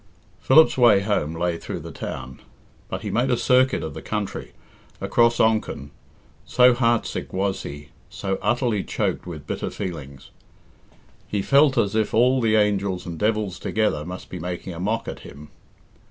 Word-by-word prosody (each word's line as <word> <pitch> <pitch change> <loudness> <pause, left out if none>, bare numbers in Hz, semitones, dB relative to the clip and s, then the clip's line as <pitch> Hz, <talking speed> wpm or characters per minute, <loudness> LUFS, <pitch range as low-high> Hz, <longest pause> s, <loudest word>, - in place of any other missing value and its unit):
Philip's 145 0 +5
way 110 -5 +6
home 95 -6 -1
lay 85 0 -1
through - - -6
the - - -8
town, 65 +1 -7 0.5
but - - -5
he - - -3
made 120 +4 +1
a 125 - +2
circuit 130 +2 +3
of 80 - -5
the - - -8
country, 105 -2 -4 0.5
across 120 0 +2
Onchan, 110 -10 +1 0.5
so 125 0 +5
heartsick 120 -2 0
was 95 +1 -1
he, 75 +1 -8 0.2
so 95 0 -3
utterly 115 -1 0
choked - - -2
with 75 -4 -8
bitter - - -3
feelings. 75 -8 -7 1.0
He 100 -2 -2
felt 140 +1 +4
as 105 -3 +2
if 110 -1 0
all 125 +3 +4
the 110 -2 +2
angels 100 -3 +1
and 85 -2 -6
devils 105 -4 0
together 105 -9 0
must 90 +3 -8
be 90 - -5
making 90 +1 -5
a 85 - -8
mock 110 +5 -1
at - - -6
him. 75 +1 -12
105 Hz, 165 wpm, -23 LUFS, 90-115 Hz, 1.0 s, way